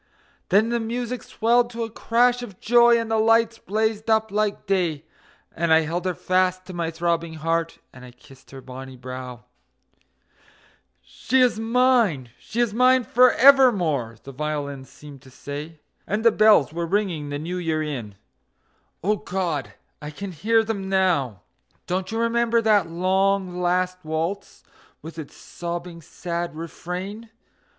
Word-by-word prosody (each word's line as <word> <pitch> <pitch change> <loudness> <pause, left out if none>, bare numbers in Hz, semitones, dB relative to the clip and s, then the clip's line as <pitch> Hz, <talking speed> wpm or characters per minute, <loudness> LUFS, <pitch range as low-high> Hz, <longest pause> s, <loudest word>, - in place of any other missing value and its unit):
Then 210 +4 +3
the 235 0 0
music 240 +1 -4
swelled 240 +2 +1
to 235 -1 -4
a 225 - -6
crash 245 +2 +2
of 205 -6 -10
joy, 235 +1 +5
and 225 -1 -4
the 220 - +2
lights 225 +1 +3
blazed 220 +2 -2
up 220 -1 +2
like 210 0 -1
day, 175 -6 -1 0.5
And 170 0 -1
I 160 0 +6
held 170 +3 -3
her 185 -2 -1
fast 185 +1 0
to 185 - -9
my 170 -2 -2
throbbing 165 0 -2
heart, 165 +1 -2 0.2
and 125 - -13
I 125 - -11
kissed 125 +2 -19
her 135 -1 -10
bonny 130 0 -10
brow. 125 -1 -8 1.6
"She 260 +2 -1
is 250 -3 +3
mine, 225 - +2
she 235 +2 -3
is 235 -4 0
mine 255 +2 +4
for 250 +2 +5
evermore!" 190 - +4
the 135 - -9
violins 140 -1 -4
seemed 145 -3 -13
to 135 - -16
say, 145 +4 -8 0.3
And 215 +3 -2
the 230 - +7
bells 210 - +4
were 170 0 -3
ringing 175 -6 -1
the 145 - -3
New 170 +5 -5
Year 160 -3 -1
in 120 -9 -6 0.9
O 210 +3 +1
God! 180 -7 -3 0.3
I 150 - -6
can 190 +6 -7
hear 225 +7 +2
them 200 -3 -4
now. 170 - 0 0.4
Don't 185 +2 -3
you 225 - -3
remember 230 0 +1
that 215 -5 +2
long, 185 +1 0
last 180 +1 0
waltz, 160 +5 -4 0.4
with 160 +1 -9
its 150 - -9
sobbing, 170 0 -7
sad 170 0 -5
refrain? 180 +7 -7
185 Hz, 155 wpm, -23 LUFS, 155-225 Hz, 1.6 s, the